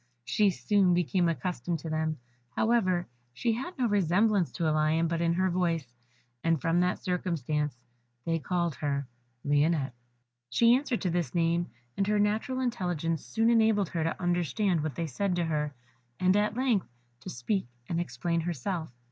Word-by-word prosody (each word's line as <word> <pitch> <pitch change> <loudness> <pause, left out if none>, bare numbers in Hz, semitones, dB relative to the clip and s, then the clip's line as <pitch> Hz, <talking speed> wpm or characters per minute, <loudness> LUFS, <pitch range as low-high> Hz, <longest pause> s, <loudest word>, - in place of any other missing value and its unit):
She 200 - +3
soon 190 -1 +2
became 175 0 +2
accustomed 165 +1 -2
to 165 - -5
them, 155 0 -1 0.4
however; 185 -6 +2 0.3
she 235 -2 +1
had 270 +10 -5
no 255 - +1
resemblance 200 -1 +2
to 170 -3 -1
a 155 - +2
lion 155 +2 +2
but 165 0 -1
in 170 0 +2
her 185 +1 +1
voice, 165 -8 -1 0.5
and 165 -2 +2
from 165 +4 +1
that 180 0 +2
circumstance 150 -6 -2 0.5
they 165 -1 0
called 170 +1 -1
her 140 -1 -1 0.4
Lionette. 145 -2 +2 0.6
She 235 0 +5
answered 255 -2 0
to 185 - 0
this 175 0 -1
name, 170 +1 +1 0.3
and 195 - 0
her 210 0 +2
natural 215 +5 0
intelligence 175 - -1
soon 225 +1 +2
enabled 220 -5 +3
her 165 -2 -1
to 165 - -2
understand 175 - +1
what 150 -4 -3
they 170 - -2
said 180 +6 -1
to 175 -1 0
her, 150 -2 -1 0.5
and 185 +1 +4
at 210 +1 +1
length 250 -7 +1 0.3
to - - -8
speak 120 - -2 0.2
and 170 0 0
explain 170 -1 -1
herself. 165 0 -3
175 Hz, 165 wpm, -29 LUFS, 160-200 Hz, 0.6 s, She